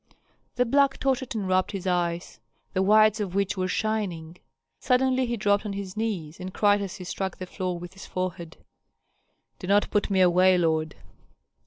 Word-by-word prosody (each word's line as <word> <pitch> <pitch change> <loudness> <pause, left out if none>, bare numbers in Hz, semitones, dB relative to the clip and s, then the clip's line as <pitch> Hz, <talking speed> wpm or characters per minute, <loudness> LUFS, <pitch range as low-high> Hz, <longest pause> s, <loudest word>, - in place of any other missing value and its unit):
The 250 - +2
black 275 +2 +3
tottered 260 -2 -1
and 205 -3 -2
rubbed 185 +2 +1
his 195 -2 -5
eyes, 175 -7 -1 0.3
the 185 - +1
whites 215 +2 +5
of 195 -3 -3
which 200 -1 0
were 185 -1 -1
shining. 185 -6 -2 0.4
Suddenly 255 0 +2
he 235 0 -2
dropped 205 -1 +2
on 210 -2 -4
his 195 -1 -6
knees, 195 -8 -3
and 185 +1 -6
cried 205 +1 +3
as 195 -3 -5
he 185 - -8
struck 190 +1 -4
the 185 - -6
floor 180 -1 -4
with 175 +1 -9
his 195 - -11
forehead, 180 -3 -5 1.0
"Do 180 - -7
not 205 +1 +2
put 210 -1 +1
me 190 -2 +2
away, 185 +1 +5
lord." 160 -2 0
190 Hz, 180 wpm, -26 LUFS, 180-215 Hz, 1.0 s, whites